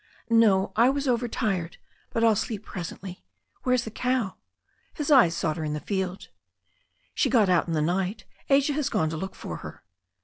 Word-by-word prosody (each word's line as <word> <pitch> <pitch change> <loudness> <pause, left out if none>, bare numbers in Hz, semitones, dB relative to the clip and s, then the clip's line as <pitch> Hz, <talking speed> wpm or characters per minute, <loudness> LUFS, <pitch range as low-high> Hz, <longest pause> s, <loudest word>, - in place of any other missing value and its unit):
"No, 210 -4 +4
I 235 +3 +5
was 280 +1 -1
overtired. 225 -8 -1 0.3
But 230 - -1
I'll 225 -2 +5
sleep 215 +1 -3
presently. 185 +1 -7 0.4
Where's 250 -1 +1
the 220 - -7
cow 245 -4 -1 0.3
?" - - -41
His 300 -1 -2
eyes 235 - +6
sought 155 -1 -1
her 160 - -3
in 150 -1 -2
the 150 - -2
field. 190 +1 -3
I - - -39 0.8
"She - - +1
got 220 -6 +4
out 180 -1 +3
in 165 - -2
the 155 - +1
night. 190 +5 -1 0.2
Asia 280 +1 +4
has 285 -1 -1
gone 160 - 0
to 160 - -4
look 190 +3 -5
for - - -6
her." - - -10
205 Hz, 195 wpm, -26 LUFS, 180-245 Hz, 0.8 s, eyes